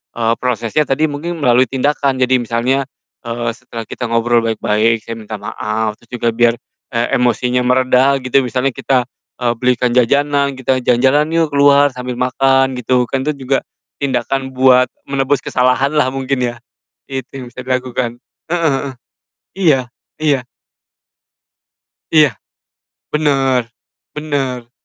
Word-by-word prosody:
eee, 115 Hz, -1 st, +1 dB
prosesnya 125 Hz, +4 st, 0 dB
tadi 150 Hz, +3 st, +1 dB
mungkin 160 Hz, +2 st, -5 dB
melalui 125 Hz, 0 st, +4 dB
tindakan, 140 Hz, 0 st, 0 dB
jadi 130 Hz, 0 st, +3 dB
misalnya, 120 Hz, +3 st, 0 dB, 0.4 s
eee, 120 Hz, 0 st, -2 dB
setelah 115 Hz, 0 st, -8 dB
kita 120 Hz, +2 st, -5 dB
ngobrol 115 Hz, +1 st, +2 dB
baik-baik, 110 Hz, 0 st, +1 dB
"Saya 115 Hz, 0 st, -7 dB
minta 110 Hz, 0 st, -7 dB
maaf," 105 Hz, +1 st, -3 dB
terus 120 Hz, -, -24 dB
juga 120 Hz, -1 st, 0 dB
biar, 115 Hz, 0 st, +3 dB, 0.3 s
e 120 Hz, +1 st, 0 dB
emosinya 125 Hz, +1 st, +1 dB
mereda 130 Hz, +2 st, +3 dB
gitu 130 Hz, +1 st, +3 dB
misalnya 125 Hz, +1 st, 0 dB
kita, 130 Hz, +1 st, 0 dB, 0.4 s
eee, 120 Hz, -1 st, +2 dB
belikan 125 Hz, -1 st, +1 dB
jajanan 140 Hz, +3 st, +2 dB
kita, 130 Hz, 0 st, 0 dB
"Jalan-jalan 130 Hz, +4 st, +3 dB
yuk 165 Hz, -2 st, +2 dB
keluar 140 Hz, 0 st, +5 dB
sambil 125 Hz, -1 st, -5 dB
makan," 135 Hz, +1 st, +2 dB
gitu 125 Hz, +1 st, +2 dB
kan 135 Hz, +1 st, -1 dB
itu 150 Hz, -, 0 dB
juga, 135 Hz, +1 st, +1 dB, 0.4 s
tindakan 130 Hz, 0 st, -2 dB
buat 130 Hz, 0 st, +5 dB, 0.2 s
menebus 140 Hz, 0 st, 0 dB
kesalahan 130 Hz, +2 st, +2 dB
lah 150 Hz, -4 st, +2 dB
mungkin 135 Hz, 0 st, -2 dB
ya, 120 Hz, -, -5 dB, 0.6 s
itu 130 Hz, -2 st, -4 dB
yang 130 Hz, -2 st, -7 dB
bisa 125 Hz, -, -11 dB
dilakukan, 125 Hz, -2 st, -2 dB, 0.3 s
heeh 170 Hz, -3 st, +2 dB
heeh, 135 Hz, 0 st, -4 dB, 0.6 s
iya, 155 Hz, -9 st, +3 dB, 0.4 s
iya. 140 Hz, -5 st, +1 dB, 1.7 s
Iya, 155 Hz, -4 st, +5 dB, 0.8 s
bener, 135 Hz, -5 st, +1 dB, 0.5 s
bener. 135 Hz, -5 st, -3 dB
130 Hz, 135 wpm, -16 LUFS, 120-140 Hz, 1.7 s, keluar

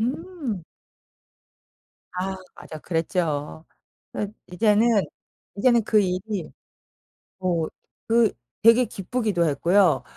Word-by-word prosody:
음. 265 Hz, -, -3 dB, 1.5 s
아 190 Hz, +1 st, -3 dB, 0.2 s
맞아. 155 Hz, -, -9 dB
그랬죠. 160 Hz, -2 st, -2 dB, 0.5 s
그 205 Hz, 0 st, -3 dB, 0.2 s
이제는, 215 Hz, +4 st, +3 dB, 0.7 s
이제는 235 Hz, +2 st, +3 dB
그 215 Hz, 0 st, +3 dB
일이 185 Hz, -1 st, -3 dB, 0.9 s
어 175 Hz, -3 st, 0 dB, 0.4 s
그 230 Hz, -1 st, +4 dB, 0.3 s
되게 230 Hz, +2 st, +7 dB
기쁘기도 200 Hz, -4 st, -1 dB
했고요, 170 Hz, +4 st, +3 dB
200 Hz, 165 characters per minute, -24 LUFS, 175-230 Hz, 1.5 s, 되게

